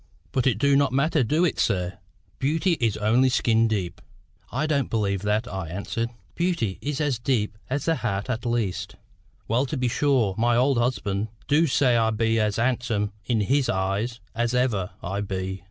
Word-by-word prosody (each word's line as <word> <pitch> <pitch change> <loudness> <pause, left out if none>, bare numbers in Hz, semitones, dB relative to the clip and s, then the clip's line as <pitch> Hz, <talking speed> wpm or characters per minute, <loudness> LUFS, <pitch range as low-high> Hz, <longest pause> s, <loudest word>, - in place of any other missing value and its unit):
"But 130 0 +1
it 120 -6 +2
du 140 +4 +3
not 140 -1 +3
matter, 140 +2 +2
du 155 +9 +2
it, 170 - -1
sir? 90 -2 0 0.4
Beauty 160 +7 +1
is 115 -3 +1
only 115 +5 +3
skin 115 -2 +3
deep." 100 -3 -2 0.5
"I 135 +6 0
don't 140 -5 0
believe 100 -4 0
that," 105 +4 0
I 95 -6 -4
answered. 100 +6 -3 0.2
"Beauty 170 - -1
is 145 0 -3
as 145 -6 0
deep 115 -4 0
as 140 +2 -2
the 165 -1 +2
heart 100 -4 -2
at 120 -2 -2
least." 115 -6 -2 0.5
"Well 125 +5 +1
to 150 - -3
be 125 -1 +1
sure, 125 -6 +2
my 120 +1 +3
old 130 +1 +3
husband 110 -4 -1 0.2
du 155 +3 +4
say 130 -3 +3
I 110 -1 +3
be 115 +1 +1
as 105 -1 +1
handsome 115 -4 0
in 115 -3 +1
his 135 +5 +1
eyes 100 +5 -1
as 120 +1 0
ever 110 -7 +1
I 95 +3 -2
be. 95 -1 -3
115 Hz, 185 wpm, -25 LUFS, 105-135 Hz, 0.5 s, du